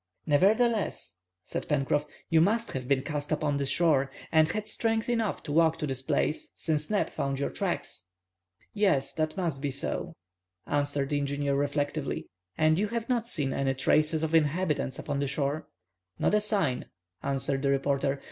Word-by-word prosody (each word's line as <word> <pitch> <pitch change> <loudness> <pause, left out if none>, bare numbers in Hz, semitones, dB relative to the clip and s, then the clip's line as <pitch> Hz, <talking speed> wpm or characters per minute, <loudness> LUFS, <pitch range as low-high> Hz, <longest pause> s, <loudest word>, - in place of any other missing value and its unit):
"Nevertheless," 205 - +2 0.3
said - - -4
Pencroff, 145 0 +1 0.2
"you 160 -1 +4
must 225 +6 +2
have 130 -2 -4
been 130 -1 +2
cast 150 0 -4
upon 150 -2 +1
the 140 -1 -1
shore, 140 -2 +3 0.2
and 155 -1 +5
had 215 +4 -3
strength 225 0 0
enough 230 -4 0
to - - -5
walk 160 +1 +4
to - - -2
this 135 -2 -2
place, 150 +3 0
since 155 -2 -1
Neb 210 -1 +1
found 135 0 -2
your 140 - -1
tracks." 90 0 -3 0.6
"Yes, 185 -10 +2
that 155 +2 -1
must 165 -7 -1
be 145 - -1
so," 140 +1 -3 0.5
answered 145 -1 0
the 145 - +1
engineer, 140 0 -1
reflectively. 145 +1 -1 0.3
"And 155 +1 +3
you 210 - +1
have 235 +2 -3
not 235 -2 +1
seen 145 - +1
any 135 -1 0
traces 155 +4 +2
of 160 0 -1
inhabitants 155 -3 +1
upon 145 -2 -3
the 140 - 0
shore?" 140 +2 -1 0.5
"Not - - +1
a 210 - +4
sign," 195 - 0 0.4
answered 135 0 0
the 140 - +1
reporter. 140 0 +1
150 Hz, 170 wpm, -29 LUFS, 140-175 Hz, 0.6 s, and